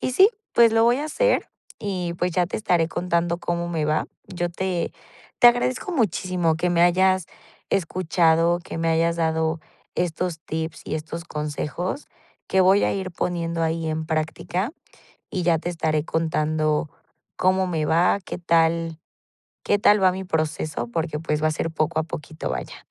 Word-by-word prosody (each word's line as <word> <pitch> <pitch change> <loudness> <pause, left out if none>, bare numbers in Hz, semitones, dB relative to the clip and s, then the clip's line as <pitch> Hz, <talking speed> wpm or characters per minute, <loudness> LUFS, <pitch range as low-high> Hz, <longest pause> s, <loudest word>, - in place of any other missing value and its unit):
Y - - -1
sí, 380 +8 +7 0.2
pues, 230 -1 +6
lo 225 0 +4
voy 240 +2 +4
a 295 - -2
hacer, - - +1 0.3
y 180 -4 -3
pues, 175 0 -1
ya 180 -1 +2
te - - -4
estaré 175 -6 +1
contando 170 -1 0
cómo 170 0 -2
me 160 -3 -1
va. 155 0 +1 0.2
Yo 175 -1 -3
te 180 0 -2 0.5
te 240 - +9
agradezco 250 +8 0
muchísimo 185 - +1
que 175 +2 0
me 170 0 +3
hayas 185 0 +3 0.4
escuchado, 170 -2 +2
que - - -8
me 165 0 0
hayas 165 +1 +2
dado 160 -1 0 0.3
estos 175 -1 -2
tips 160 0 -4
y - - -3
estos 165 +2 -6
consejos 150 - -4 0.4
que 190 - +3
voy 190 +2 +5
a - - +1
ir 190 -1 -3
poniendo 170 -1 -2
ahí 165 0 -1
en 155 0 -2
práctica 165 - -2 0.6
y 180 - -2
ya 165 -2 +3
te 175 - -4
estaré 155 -2 0
contando 155 -1 0 0.5
cómo 185 0 +2
me 160 -4 -1
va, 170 +5 +3
qué - - -6
tal 165 -1 +1 0.6
qué 205 - +2
tal 205 0 +4
va 185 -1 +5
mi 190 +1 -5
proceso 155 -5 -2
porque, 155 +4 -2
pues, 150 -1 -1
va 155 - +4
a - - +1
ser 165 +1 -2
poco 160 0 -1
a 160 - -2
poquito, 155 -1 -6
vaya. 65 -1 -6
170 Hz, 175 wpm, -24 LUFS, 160-185 Hz, 0.6 s, te